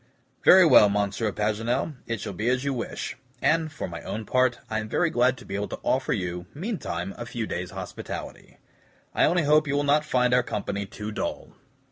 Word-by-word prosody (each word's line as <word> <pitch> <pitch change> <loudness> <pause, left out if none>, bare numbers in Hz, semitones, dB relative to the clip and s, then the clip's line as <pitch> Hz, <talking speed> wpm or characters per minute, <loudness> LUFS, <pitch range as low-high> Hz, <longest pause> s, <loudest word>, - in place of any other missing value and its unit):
"Very 185 0 +8
well, 105 -9 +7
Monsieur 105 +2 0
Paganel, 115 +8 -1
it 115 -1 -2
shall - - -5
be 110 +6 -1
as 130 +1 +1
you 140 -1 0
wish; 120 - -4 0.2
and, 160 +2 +2
for 145 - -5
my 85 -1 -7
own 110 +1 -5
part, 130 0 +2
I 110 - -1
am 110 0 -6
very 170 +7 +1
glad 125 +1 +3
to 125 - -13
be - - -7
able 100 +1 -2
to - - -7
offer 130 0 +1
you, 90 -2 -2
meantime, 140 - -4
a 120 - -4
few 120 -1 -3
days' 90 -3 -4
hospitality. - - -7 0.6
I - - +4
only 175 +1 +2
hope 150 +1 +4
you 140 - 0
will 145 - +1
not 145 +1 +3
find 125 -4 +2
our 125 - +5
company 100 -3 -3
too 105 +2 -6
dull." - - -4
120 Hz, 205 wpm, -26 LUFS, 105-145 Hz, 0.6 s, Very